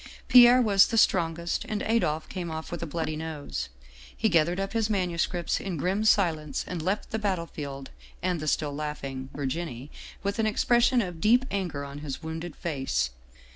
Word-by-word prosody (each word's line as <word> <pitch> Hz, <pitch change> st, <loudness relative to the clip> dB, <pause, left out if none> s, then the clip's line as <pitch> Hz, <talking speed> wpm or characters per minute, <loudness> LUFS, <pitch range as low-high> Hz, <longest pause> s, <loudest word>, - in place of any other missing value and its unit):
" -, -, -25 dB
Pierre 250 Hz, 0 st, +8 dB
was 200 Hz, -3 st, +5 dB
the 230 Hz, -, -1 dB
strongest, 170 Hz, -4 st, +2 dB
and 210 Hz, -1 st, -2 dB
Adolphe 160 Hz, -9 st, 0 dB
came 180 Hz, -3 st, -5 dB
off 160 Hz, 0 st, -6 dB
with 175 Hz, -, -4 dB
a 170 Hz, -, -3 dB
bloody 155 Hz, 0 st, -3 dB
nose. 145 Hz, -, -5 dB, 0.5 s
He 220 Hz, -, +2 dB
gathered 170 Hz, +1 st, +2 dB
up 195 Hz, 0 st, -3 dB
his 225 Hz, -1 st, +1 dB
manuscripts 175 Hz, -3 st, 0 dB
in 185 Hz, -4 st, -4 dB
grim 190 Hz, +8 st, 0 dB
si 210 Hz, -2 st, +6 dB
lence 150 Hz, -3 st, -5 dB
and 180 Hz, -3 st, -4 dB
left 190 Hz, +6 st, -2 dB
the 220 Hz, -, -1 dB
battlefield 160 Hz, -9 st, -4 dB, 0.3 s
and 180 Hz, -2 st, -1 dB
the 155 Hz, -, -5 dB
still 150 Hz, -1 st, 0 dB
laughing 140 Hz, -3 st, -5 dB
Virginie 140 Hz, -1 st, -4 dB, 0.3 s
with 200 Hz, +3 st, -2 dB
an 220 Hz, -, +2 dB
expression 240 Hz, +3 st, +3 dB
of 175 Hz, -3 st, -7 dB
deep 245 Hz, +4 st, +4 dB
anger 175 Hz, -8 st, -2 dB
on 140 Hz, +1 st, -8 dB
his 145 Hz, +1 st, -6 dB
wounded 160 Hz, 0 st, -5 dB
face. 135 Hz, -, -1 dB
170 Hz, 180 wpm, -27 LUFS, 150-200 Hz, 0.5 s, Pierre